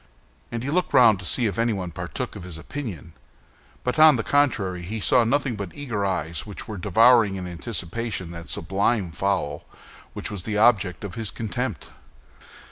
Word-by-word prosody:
And 120 0 -4
he 140 - -2
looked 180 +3 0
round 115 -6 +6
to 95 - -7
see 125 - +2
if 100 -1 -1
anybody 100 -7 0
partook 90 +9 -5
of 100 - -7
his 85 -3 -8
opinion; 90 - -7 0.7
but 125 +4 -1
on 155 -1 +9
the - - -1
contrary, 110 -11 +1
he 105 +6 -5
saw 120 +3 +4
nothing 130 +1 +1
but 100 -3 -5
eager 120 -8 -3
eyes 85 -5 -2
which 105 -2 -9
were 110 - -6
devouring, 105 +2 +5
in 95 -1 -5
anticipation, 95 +1 -4
that 85 -3 -9
sublime 100 -1 0
fowl 90 -6 -1 0.5
which - - -5
was 100 -3 -4
the 105 +3 -3
object 105 -5 +3
of 100 -4 -6
his 110 0 -3
contempt. 110 -4 -4
105 Hz, 175 wpm, -24 LUFS, 90-120 Hz, 0.7 s, on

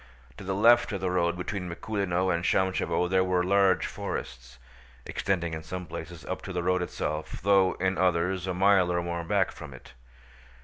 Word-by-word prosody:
To - - -9
the 95 0 -2
left 120 +4 +5
of 100 - -2
the 95 -1 -1
road 85 -1 +1
between 90 0 -4
Mikúlino 95 -1 -1
and 85 0 -2
Shámshevo 95 -1 +1
there 95 +1 +2
were 90 -1 +1
large 95 -1 +3
forests, 60 0 -6 0.5
extending 85 -4 -2
in 80 - -4
some 90 +3 -6
places 85 0 -8
up 95 - -4
to 100 - -7
the 90 -1 -2
road 90 +1 +1
itself 75 -3 -4
though 95 -1 +4
in 95 0 -1
others 90 +1 +1
a 95 - -1
mile 95 -1 +4
or 85 0 0
more 85 0 -3
back 80 - +1
from - - -10
it. - - -15
90 Hz, 185 wpm, -27 LUFS, 85-95 Hz, 0.5 s, left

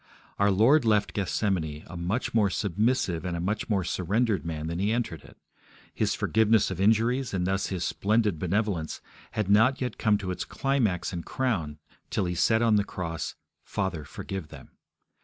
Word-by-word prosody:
Our 100 0 +4
Lord 115 +10 +5
left 105 -2 +2
Gethsemane 90 -6 -1
a 90 - -10
much 90 +8 -2
more 105 -3 +3
submissive 100 -2 0
and 90 -2 -2
a - - -3
much 100 +7 -2
more 100 -4 +1
surrendered 95 - 0
man 80 -2 -4
than 85 +2 -3
He 100 +3 +1
entered 115 -9 -2
it. - - -16 0.6
His - - 0
forgiveness 110 -2 +3
of 95 0 -3
injuries, 115 +4 +2
and 90 -1 0
thus 95 +1 0
His 90 -3 -3
splendid 105 -4 +1
benevolence, 95 -2 -1 0.3
had 110 -3 -1
not 110 +7 +4
yet 125 -1 -3
come 105 -2 +3
to 95 -2 -4
its 90 - -3
climax 120 -11 0
and 85 -1 -4
crown 90 - -2 0.3
till - - 0
He 90 - -1
said 110 +6 +3
on 110 -2 +4
the 100 - +3
cross, 85 -5 -5 0.3
'Father, 95 -6 -3
forgive 90 +4 -6
them'. - - -13
100 Hz, 175 wpm, -27 LUFS, 90-110 Hz, 0.6 s, Lord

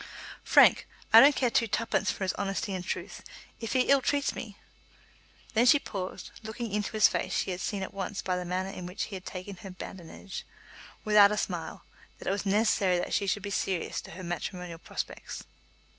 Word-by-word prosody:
"Frank, - - +6 0.3
I - - +12
don't 285 +1 +8
care 250 -3 +1
twopence 230 0 +1
for - - -2
his 185 - 0
honesty 195 0 -2
and 185 -1 -3
truth. - - -5 0.4
If 225 - -4
he 260 - +4
ill 275 +1 +4
treats 280 +2 +1
me 205 -3 -8 0.5
" - - -27
Then 235 +2 +4
she 290 - +8
paused; 190 -9 -6
looking 220 0 -5
into 205 +1 -2
his 215 -1 +6
face - - -2
she - - -1
had 180 0 -4
seen 200 -3 -2
at - - -7
once 195 +1 -4
by 185 - 0
the 180 - -2
manner 185 +2 -2
in 180 -2 -7
which 180 - -4
he 200 - -6
had 185 - -8
taken 185 +1 -7
her 195 - -9
badinage, 185 +1 -8 0.6
without 210 -1 +7
a 210 - -1
smile, 170 -6 -4 0.3
that - - -10
it - - +2
was 200 +1 -2
necessary 195 -3 +3
that 175 - -3
she 200 - +1
should 200 +1 0
be 205 - -4
serious 190 -3 -1
as - - -1
to - - -12
her 185 - -7
matrimonial 175 -1 -5
prospects. - - -6
195 Hz, 205 wpm, -29 LUFS, 185-215 Hz, 0.6 s, I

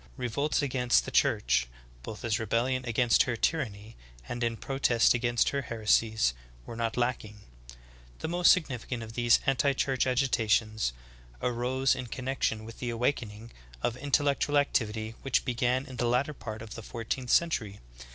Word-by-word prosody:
Revolts 140 +5 -1
against 125 -3 +2
the - - -6
Church, - - +2 0.3
both 105 - -7
as 110 -2 0
rebellion 120 +4 0
against 115 0 +3
her 120 - 0
tyranny 110 -6 -2 0.3
and 120 0 -4
in 115 -1 -1
pro 135 +3 -5
test 120 -4 +4
against 120 -1 +1
her 140 - -1
heresies, 110 - +1 0.3
were - - -8
not 115 0 -2
lacking. 110 -4 -2 0.8
The - - -4
most 175 +1 +5
sig 185 -3 +3
nificant 125 -2 -5
of 110 0 -9
these 120 0 +4
anti 135 +1 +2
church 130 -1 0
agitations 110 - +1 0.5
arose 125 +2 +1
in 125 -1 -5
connection 125 -3 -2
with 115 0 -11
the 125 - -3
awakening 115 -2 -2 0.3
of 120 - 0
intellectual 145 +1 +1
activity 110 -5 0
which 135 - 0
began 125 +1 0
in 130 - -10
the 120 - 0
latter 125 +5 +1
part 110 -5 -7
of 110 - -9
the 115 - -7
fourteenth 115 +3 -5
century. 115 -13 +1
120 Hz, 160 wpm, -29 LUFS, 110-130 Hz, 0.8 s, most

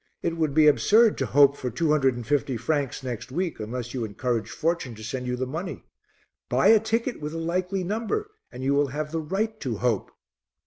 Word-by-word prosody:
It 170 -1 0
would 155 -4 -1
be 155 -1 +6
absurd 215 +9 +5
to 135 - 0
hope 140 +1 +5
for 130 - -4
two 150 +6 0
hundred 135 -4 +3
and 120 -1 -6
fifty 135 -1 0
francs 140 +2 -1
next 125 -1 -5
week 175 0 -2
unless 120 +2 -5
you 125 -3 -2
encouraged 115 +1 -2
Fortune 155 -4 -1
to 110 - -11
send 125 +3 -4
you 125 - -1
the 130 +1 -2
money. 160 +8 -5 0.7
Buy - - +4
a 225 - +7
ticket 230 - -1
with 150 +2 -4
a - - -2
likely 180 +3 -1
number 230 - -2 0.2
and 125 0 -7
you 135 +1 +2
will 145 0 +3
have 150 +3 -4
the 165 0 -1
right 215 +7 -2
to 120 -6 -3
hope." 115 -3 0
145 Hz, 215 wpm, -26 LUFS, 125-175 Hz, 0.7 s, a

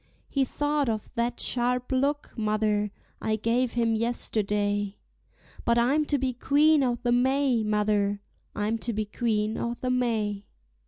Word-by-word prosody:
He 275 -2 +1
thought 290 0 0
of 215 -2 -4
that 240 0 -1
sharp 250 +1 0
look, 280 +3 0
mother, 215 -1 0 0.3
I 220 - 0
gave 230 +3 0
him 230 -1 +1
yesterday, 205 -3 0 0.7
But 235 0 +2
I'm 275 +6 +3
to 290 - +1
be 260 -1 -1
Queen 290 +5 +4
o' 245 -2 +1
the 240 - +1
May, 260 0 +2
mother, 210 -1 +1 0.3
I'm 215 +2 -1
to 235 +1 -2
be 215 0 -1
Queen 215 0 -1
o' 235 0 -2
the 255 +1 -2
May. 220 -5 -1
235 Hz, 150 wpm, -27 LUFS, 210-255 Hz, 0.7 s, Queen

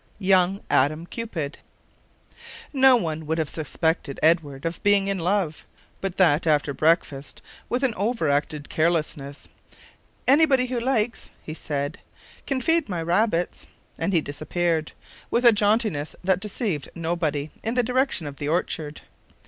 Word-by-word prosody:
"YOUNG 190 -1 +3
ADAM 155 +5 +2
CUPID" 170 -9 -5 1.1
NO 265 -2 +7
one 160 -7 -2
would 160 +1 0
have 160 -3 -1
suspected 160 -1 -2
Edward 155 -3 +2
of 165 0 -3
being 200 -1 +4
in 195 -1 -1
love, 175 -3 0 0.4
but 195 -2 -4
that 165 -3 +3
after 145 -2 +2
breakfast, 150 -2 0 0.3
with 250 +2 -1
an 255 -4 +2
over 210 -3 -1
acted 145 +1 -1
carelessness, 155 -4 -1 0.8
"Anybody 275 -2 +5
who 250 -1 -2
likes," 235 -2 -1
he 155 - -6
said, 145 +2 -4 0.5
"can 270 -2 -1
feed 325 -1 +2
my 175 -3 -2
rabbits," 175 +1 0 0.3
and 200 - 0
he 170 -4 +3
disappeared, 160 +2 -2 0.4
with 245 +1 +1
a 235 - +10
jauntiness 210 - +1
that 185 0 +2
deceived 200 - -3
nobody, 160 -3 -2
in 225 +2 -2
the 250 - +3
direction 255 - 0
of 140 -1 -7
the 145 - -4
orchard. 155 -2 -2
170 Hz, 140 wpm, -24 LUFS, 155-215 Hz, 1.1 s, a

